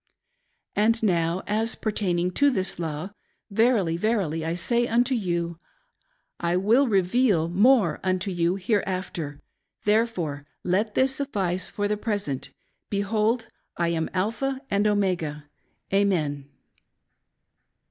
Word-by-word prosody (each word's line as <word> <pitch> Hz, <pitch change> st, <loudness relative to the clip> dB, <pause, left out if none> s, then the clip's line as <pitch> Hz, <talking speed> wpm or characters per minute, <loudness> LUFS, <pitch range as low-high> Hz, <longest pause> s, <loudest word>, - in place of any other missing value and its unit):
And 225 Hz, +2 st, +2 dB
now, 170 Hz, -2 st, +1 dB
as 220 Hz, +2 st, 0 dB
pertaining 180 Hz, -5 st, -1 dB
to 285 Hz, +9 st, +4 dB
this 190 Hz, -8 st, 0 dB
law: 160 Hz, +3 st, -4 dB, 0.4 s
Verily, 200 Hz, -6 st, +2 dB
verily 180 Hz, -6 st, 0 dB
I 165 Hz, +1 st, -1 dB
say 235 Hz, +7 st, 0 dB
unto 245 Hz, +3 st, +2 dB
you, 170 Hz, -6 st, -2 dB, 0.8 s
I 170 Hz, +1 st, +1 dB
will 230 Hz, +9 st, +4 dB
reveal 195 Hz, -3 st, +2 dB
more 200 Hz, -, +4 dB
unto 185 Hz, +1 st, 0 dB
you, 175 Hz, 0 st, +1 dB
hereafter; 185 Hz, -7 st, -2 dB, 0.5 s
therefore, 190 Hz, -10 st, 0 dB, 0.2 s
let 205 Hz, +4 st, 0 dB
this 265 Hz, +1 st, +3 dB
suffice 195 Hz, -10 st, -1 dB
for 205 Hz, 0 st, -1 dB
the 210 Hz, 0 st, -1 dB
present. 205 Hz, -, -3 dB, 0.4 s
Behold, 215 Hz, +3 st, 0 dB, 0.3 s
I 170 Hz, -1 st, +1 dB
am 165 Hz, -1 st, -1 dB
Alpha 230 Hz, +8 st, -1 dB
and 200 Hz, +1 st, +2 dB
Omega. 180 Hz, -8 st, 0 dB, 0.5 s
Amen. 155 Hz, -9 st, +1 dB
195 Hz, 115 wpm, -25 LUFS, 170-220 Hz, 0.8 s, to